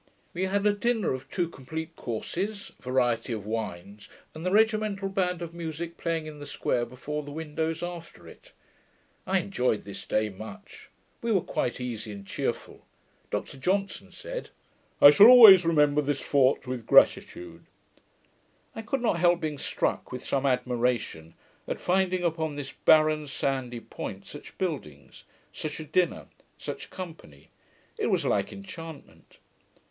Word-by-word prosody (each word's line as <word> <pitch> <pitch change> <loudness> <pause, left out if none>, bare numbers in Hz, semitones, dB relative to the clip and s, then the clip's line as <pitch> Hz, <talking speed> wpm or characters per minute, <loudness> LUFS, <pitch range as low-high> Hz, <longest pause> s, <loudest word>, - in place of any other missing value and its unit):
We 185 +2 -1
had 200 +2 0
a 210 - +4
dinner 225 - 0
of 130 +1 -7
two 175 -3 -1
complete 160 +2 -7
courses, 195 - -4
variety 120 -2 0
of 105 -3 -5
wines, 105 -2 -5 0.2
and 160 - -8
the 185 - 0
regimental 215 -2 +2
band 180 -2 -1
of 170 -1 -7
musick 170 0 -5
playing 165 -2 -2
in 155 -1 -9
the 145 - -8
square, 120 -1 -1
before 145 +5 -5
the 145 - -10
window, 160 +1 -2
after 175 -1 -8
it. - - -15 0.8
I 190 0 +2
enjoyed 125 - -1
this 100 - -7
day 110 0 +1
much. 110 - -11 0.3
We 235 - -1
were 200 - +4
quite 125 - -2
easy 115 -4 -5
and 100 -1 -10
cheerful, - - -4 0.5
Dr - - -4
Johnson 195 +7 -1
said, - - -7 0.5
'I 145 - +10
shall 200 +9 +9
always 220 -8 +10
remember 150 -3 +3
this 145 -1 -1
fort 135 -1 +2
with 125 -3 -5
gratitude.' 205 - +3 1.1
I 225 - -5
could 235 +4 -2
not 200 -7 +1
help 175 0 +4
being 150 -3 -3
struck - - -2
with 125 - -6
some 140 0 0
admiration, 125 -10 -1 0.3
at - - -3
finding 185 0 +1
upon 160 -3 -1
this 145 -1 -6
barren 155 -1 +3
sandy 130 -3 -2
point, 100 -3 -7
such 145 - -11
buildings, 105 - -5 0.3
such 155 0 -5
a - - -5
dinner, 175 +4 0 0.3
such - - -7
company: 160 - -10 0.5
it - - +1
was - - +1
like - - 0
enchantment. 175 -6 -11
155 Hz, 150 wpm, -27 LUFS, 125-185 Hz, 1.1 s, I